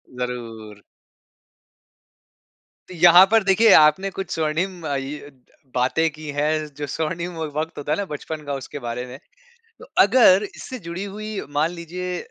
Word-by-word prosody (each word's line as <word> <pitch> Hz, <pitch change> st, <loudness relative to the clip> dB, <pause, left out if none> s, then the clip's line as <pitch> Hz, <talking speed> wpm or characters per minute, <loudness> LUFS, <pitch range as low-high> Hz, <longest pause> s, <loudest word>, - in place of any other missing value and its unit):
ज़रूर। 115 Hz, -4 st, -6 dB, 2.1 s
यहाँ 175 Hz, +2 st, +8 dB
पर 225 Hz, -2 st, +4 dB
देखिए 200 Hz, +3 st, +4 dB
आपने 155 Hz, +6 st, +5 dB
कुछ 195 Hz, +1 st, -6 dB
स्वर्णिम 165 Hz, +3 st, -2 dB
अ, 140 Hz, -, -1 dB
इ 145 Hz, +2 st, -7 dB, 0.5 s
बातें 145 Hz, +6 st, +1 dB
की 155 Hz, +1 st, -11 dB
हैं, 155 Hz, +2 st, 0 dB
जो 145 Hz, 0 st, -5 dB
स्वर्णिम 170 Hz, +4 st, -3 dB
व 160 Hz, -, -3 dB
वक़्त 160 Hz, +2 st, -3 dB
होता 145 Hz, 0 st, -4 dB
है 155 Hz, -, +1 dB
ना 200 Hz, -, -2 dB
बचपन 150 Hz, +1 st, -6 dB
का 140 Hz, -, -3 dB
उसके 135 Hz, +2 st, -7 dB
बारे 120 Hz, 0 st, -5 dB
में। 125 Hz, +1 st, -10 dB, 0.6 s
तो -, -, -12 dB, 0.2 s
अगर 200 Hz, -2 st, +5 dB
इससे 255 Hz, -, -8 dB
जुड़ी 175 Hz, +4 st, -5 dB
हुई 210 Hz, +1 st, -6 dB
मान 150 Hz, +3 st, 0 dB
लीजिए 180 Hz, +1 st, -6 dB
160 Hz, 150 wpm, -22 LUFS, 145-185 Hz, 2.1 s, यहाँ